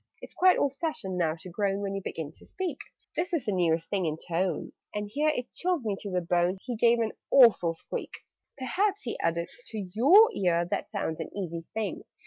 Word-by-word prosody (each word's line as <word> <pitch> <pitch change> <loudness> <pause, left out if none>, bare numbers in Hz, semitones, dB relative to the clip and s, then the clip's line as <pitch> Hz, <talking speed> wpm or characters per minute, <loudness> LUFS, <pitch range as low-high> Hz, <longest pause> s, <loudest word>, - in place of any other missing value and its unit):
"It's - - -11
quite 370 0 +5
old 280 -1 +1
fashioned 300 - -3
now 160 -2 +1
to 170 +2 -10
groan 195 +2 0
When 195 -1 -2
you 195 - -3
begin 160 -5 -5
to - - -19
speak: 370 -3 -4 0.4
This 355 +1 -2
is 285 -6 -2
the 210 - 0
newest 165 -3 +1
thing 190 -4 0
in 155 0 -2
tone 175 +2 -2
" - - -20
And 210 0 -2
here 300 +3 +2
(it 250 -5 -2
chilled 355 -8 -1
me 205 -2 0
to 205 - -6
the 180 -1 0
bone) 175 +2 +1
He 245 +4 -5
gave 235 +1 +4
an 225 -2 0 0.2
awful 215 -10 +6
squeak. - - -7 0.3
"Perhaps," 385 - 0
he 235 - -4
added, 170 +1 0 0.2
"to 220 - -6 0.2
your 375 - +7
ear 175 - +2
That 175 - -3
sounds 160 +1 -3
an 165 - -4
easy 170 -4 -4
thing? 220 -2 -2
200 Hz, 215 wpm, -28 LUFS, 170-265 Hz, 0.4 s, your